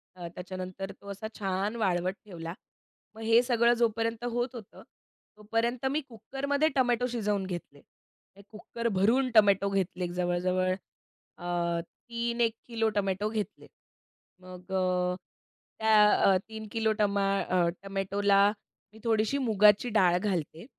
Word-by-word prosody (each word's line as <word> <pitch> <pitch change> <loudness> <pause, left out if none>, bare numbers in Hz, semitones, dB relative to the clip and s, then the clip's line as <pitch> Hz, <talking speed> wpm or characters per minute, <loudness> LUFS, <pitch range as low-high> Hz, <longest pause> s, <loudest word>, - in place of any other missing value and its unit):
अ, 175 -2 -7
त्याच्यानंतर 185 +1 -6
तो 200 - -14
असा 200 +2 -6
छान 195 +2 -1
वाळवट 185 -4 0
ठेवला. 165 -4 -7 0.6
मग 225 - -10
हे 225 +1 +5
सगळं 240 -1 +3
जोपर्यंत 230 -1 0
होत 245 +1 -2
होतं, 220 -5 -11 0.5
तोपर्यंत 230 +4 -1
मी 300 +2 0
कुकरमध्ये 280 +6 -1
टोमॅटो 245 -2 +2
शिजवून 210 -5 -1
घेतले. 175 -6 -7 0.5
ते 200 - -15
कुकरभरून 230 +3 0
टोमॅटो 200 -2 +5
घेतले 185 -2 -1
जवळ-जवळ 180 +1 0 0.6
अ, 175 -1 -1 0.3
3 235 0 -2
एक 230 -1 +3
किलो 225 -2 0
टोमॅटो 200 +1 0
घेतले. 215 -1 -5 0.7
मग 180 0 -12
अ, 180 -1 +1 0.6
त्या, 210 -3 +5
3 220 -1 -7
किलो 225 -1 +1
टमा 200 -1 +2 0.2
अ, 180 -2 +1 0.2
टोमॅटोला 195 +1 +1 0.5
मी 220 - -14
थोडीशी 225 +3 +1
मुगाची 215 -2 +4
डाळ 180 -3 +4
घालते. 175 -4 -3
205 Hz, 125 wpm, -29 LUFS, 185-230 Hz, 0.7 s, हे